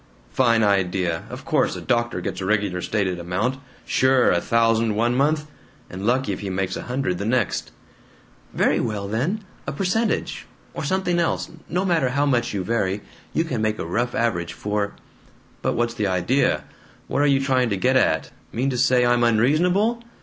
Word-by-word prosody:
"Fine 115 Hz, -3 st, +3 dB
idea! 90 Hz, -4 st, +1 dB
Of -, -, -8 dB
course -, -, +1 dB
a -, -, -5 dB
doctor 120 Hz, -6 st, 0 dB
gets 90 Hz, -, -4 dB
a -, -, -3 dB
regular 100 Hz, -3 st, 0 dB
stated 95 Hz, -4 st, -1 dB
amount! 100 Hz, +10 st, -1 dB, 0.3 s
Sure! 130 Hz, -1 st, +3 dB
A 85 Hz, -, +2 dB
thousand 115 Hz, -1 st, +2 dB
one 120 Hz, +3 st, +2 dB
month 150 Hz, +4 st, +1 dB, 0.5 s
and 95 Hz, +3 st, -4 dB
lucky 125 Hz, -3 st, +1 dB
if -, -, -5 dB
he 100 Hz, -, -4 dB
makes 95 Hz, 0 st, -2 dB
a -, -, -4 dB
hundred 125 Hz, -8 st, -1 dB
the 100 Hz, -, -3 dB
next." 115 Hz, -, 0 dB, 0.8 s
"Very -, -, +2 dB
well 105 Hz, -3 st, -2 dB
then, 145 Hz, -, -1 dB, 0.2 s
a -, -, -1 dB
percentage. 195 Hz, +9 st, -1 dB, 0.3 s
Or -, -, -5 dB
something 185 Hz, -2 st, 0 dB
else. 170 Hz, -, -1 dB, 0.2 s
No 180 Hz, +2 st, 0 dB
matter 165 Hz, -8 st, +2 dB
how 140 Hz, +3 st, +1 dB
much 120 Hz, -4 st, +1 dB
you 100 Hz, -3 st, -2 dB
vary, 105 Hz, -2 st, -1 dB, 0.3 s
you 160 Hz, -, +1 dB
can 130 Hz, -9 st, -3 dB
make 110 Hz, 0 st, 0 dB
a -, -, -4 dB
rough 120 Hz, +8 st, -1 dB
average 85 Hz, -8 st, 0 dB
for 105 Hz, +4 st, -2 dB, 0.3 s
" -, -, -31 dB
"But -, -, 0 dB
what's 120 Hz, 0 st, 0 dB
the 105 Hz, -3 st, -1 dB
idea? 95 Hz, +9 st, +1 dB, 0.4 s
What 140 Hz, -, 0 dB
are 145 Hz, -, +4 dB
you 140 Hz, -1 st, +4 dB
trying 130 Hz, -3 st, +1 dB
to 100 Hz, -, 0 dB
get 130 Hz, +7 st, +2 dB
at? 80 Hz, -, +2 dB, 0.2 s
Mean 130 Hz, +4 st, 0 dB
to 125 Hz, -, -2 dB
say 125 Hz, -2 st, +4 dB
I'm 120 Hz, 0 st, +3 dB
unreasonable? 175 Hz, -, +2 dB
120 Hz, 185 wpm, -23 LUFS, 100-135 Hz, 0.8 s, are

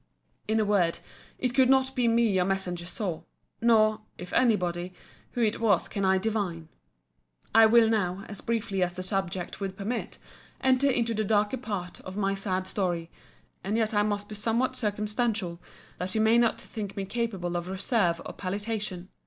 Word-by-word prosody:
In 220 Hz, +1 st, +2 dB
a 215 Hz, -, +2 dB
word, 190 Hz, -5 st, +2 dB, 0.4 s
it 250 Hz, -2 st, -1 dB
could 260 Hz, -1 st, +4 dB
not 265 Hz, 0 st, +3 dB
be 245 Hz, -2 st, +2 dB
me 230 Hz, 0 st, +4 dB
your 185 Hz, -2 st, +3 dB
messenger 180 Hz, -2 st, -2 dB
saw; 185 Hz, -4 st, -3 dB, 0.4 s
nor 215 Hz, -2 st, +4 dB, 0.2 s
(if 180 Hz, +1 st, -8 dB
any 240 Hz, -4 st, +5 dB
body) 175 Hz, -1 st, -3 dB, 0.4 s
who 240 Hz, -, 0 dB
it 215 Hz, -1 st, +1 dB
was 210 Hz, -6 st, +3 dB
can 200 Hz, -, -3 dB
I 190 Hz, 0 st, +4 dB
divine. 185 Hz, -6 st, -2 dB, 0.8 s
I 225 Hz, 0 st, +8 dB
will 230 Hz, 0 st, +6 dB
now, 200 Hz, -3 st, 0 dB
as 205 Hz, -, -8 dB
briefly 220 Hz, -4 st, -1 dB
as 175 Hz, -1 st, 0 dB
the 185 Hz, -, -4 dB
subject 185 Hz, -2 st, -3 dB
will 195 Hz, -1 st, -2 dB
permit, 205 Hz, +5 st, -4 dB, 0.4 s
enter 265 Hz, +1 st, +3 dB
into 235 Hz, -3 st, +1 dB
the 215 Hz, 0 st, 0 dB
darker 210 Hz, +3 st, +2 dB
part 205 Hz, -7 st, -5 dB
of 185 Hz, +1 st, -8 dB
my 195 Hz, -1 st, +1 dB
sad 190 Hz, -1 st, -2 dB
story: 175 Hz, -4 st, -2 dB, 0.5 s
and 205 Hz, +4 st, -1 dB
yet 220 Hz, -1 st, +1 dB
I 205 Hz, -, +3 dB
must 205 Hz, -1 st, -1 dB
be 215 Hz, -, -8 dB
somewhat 230 Hz, +5 st, 0 dB
circumstantial, 210 Hz, -4 st, -1 dB, 0.4 s
that 185 Hz, +3 st, -3 dB
you 220 Hz, -, +3 dB
may 220 Hz, +2 st, +5 dB
not 230 Hz, -1 st, +2 dB
think 210 Hz, -4 st, -6 dB
me 195 Hz, -, -2 dB
capable 195 Hz, -6 st, -2 dB
of 175 Hz, 0 st, -2 dB
reserve 190 Hz, -2 st, +1 dB
or -, -, -6 dB
palliation. 200 Hz, -1 st, -4 dB
205 Hz, 180 wpm, -28 LUFS, 185-225 Hz, 0.8 s, I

